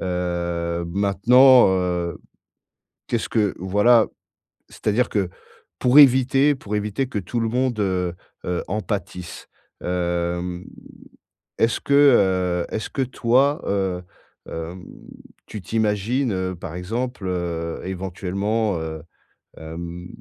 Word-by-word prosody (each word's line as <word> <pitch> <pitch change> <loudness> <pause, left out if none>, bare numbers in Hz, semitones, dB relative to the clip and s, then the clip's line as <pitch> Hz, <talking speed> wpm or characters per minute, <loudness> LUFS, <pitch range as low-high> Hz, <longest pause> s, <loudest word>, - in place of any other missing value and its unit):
Heu, 85 -2 -2
maintenant, 115 +7 +5
heu, 90 -2 -1 0.9
qu'est-ce 115 - -2
que 105 -4 +1
voilà, 105 +5 +4 0.6
c'est-à-dire 110 +3 0
que 95 -4 -1 0.5
pour 125 +3 +3
éviter 135 +1 +6
pour 105 -4 -5
éviter 105 +5 -1
que 110 - -3
tout 110 +6 -3
le 115 -1 0
monde, 125 -2 0
heu, 90 -3 0 0.3
heu, 90 -1 -2
en 105 +3 -2
pâtisse, 90 -2 -6 0.4
hem, 90 0 -2 0.9
est-ce 115 +1 +2
que, 140 - 0
heu, 95 -11 +4
est-ce 110 - -3
que 135 - -2
toi, 130 +5 +2
heu, 95 -3 -1 0.5
hem, 85 +3 -6 0.6
tu 105 - -7
t'imagines, 110 +4 0
heu, 95 0 -2
par 85 -1 -8
exemple, 115 +3 -4
heu, 85 -2 -3
éventuellement, 95 +2 -2
heu, 80 -1 -5 0.6
hem, 85 +2 -7
95 Hz, 115 wpm, -22 LUFS, 90-115 Hz, 0.9 s, éviter